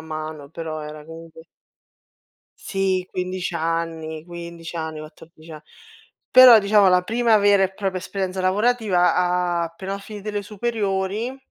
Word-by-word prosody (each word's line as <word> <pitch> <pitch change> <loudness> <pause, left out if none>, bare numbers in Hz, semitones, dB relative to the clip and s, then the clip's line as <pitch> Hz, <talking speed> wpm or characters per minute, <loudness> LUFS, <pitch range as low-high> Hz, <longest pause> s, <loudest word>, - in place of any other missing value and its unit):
mano, 155 -2 -7
però 160 -1 -6
era 150 0 -9
comunque 165 0 -12 1.2
Sì 190 -2 -1
15 185 0 -4
anni, 165 -1 -3
15 170 -1 -9
anni, 160 -2 -5
14 155 +1 -13
a 155 -1 -10 0.7
però 250 -3 +9
diciamo 200 -1 +4
la 180 0 +4
prima 230 +2 +2
vera 200 -1 +4
e 190 - -3
propria 190 -2 -3
esperienza 190 0 -4
lavorativa 180 -4 +1
appena 185 +4 -6
ho - - -6
finito 210 +1 -8
le 205 -1 -3
superiori, 210 +2 -2
180 Hz, 130 wpm, -22 LUFS, 165-200 Hz, 1.2 s, però